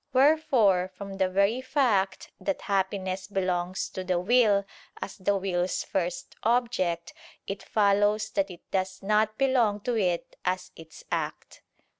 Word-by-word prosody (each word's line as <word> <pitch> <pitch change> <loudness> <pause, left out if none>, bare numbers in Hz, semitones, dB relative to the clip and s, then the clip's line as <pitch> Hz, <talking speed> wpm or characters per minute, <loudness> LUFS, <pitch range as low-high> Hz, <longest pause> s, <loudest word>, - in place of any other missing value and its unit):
Wherefore, 255 - +4
from 200 -1 -7
the 190 -1 +2
very 200 +6 +2
fact 225 -9 +1
that 295 - -2
happiness 190 -1 -1
belongs 185 -2 -1
to 185 - -5
the 180 -1 0
will, 205 0 +4 0.3
as - - -6
the 200 +1 +1
will's 185 -1 -1
first 180 -2 -3
object, 215 -8 0 0.3
it 195 0 -5
follows 210 +1 +2
that 195 -2 0
it 175 -2 -10
does 190 0 -2
not 215 +1 +2
belong 245 -6 +2
to 245 +3 -1
it 180 -5 -1
as 185 0 -2
its 160 0 -13
act. - - -4
195 Hz, 140 wpm, -27 LUFS, 185-215 Hz, 0.3 s, Wherefore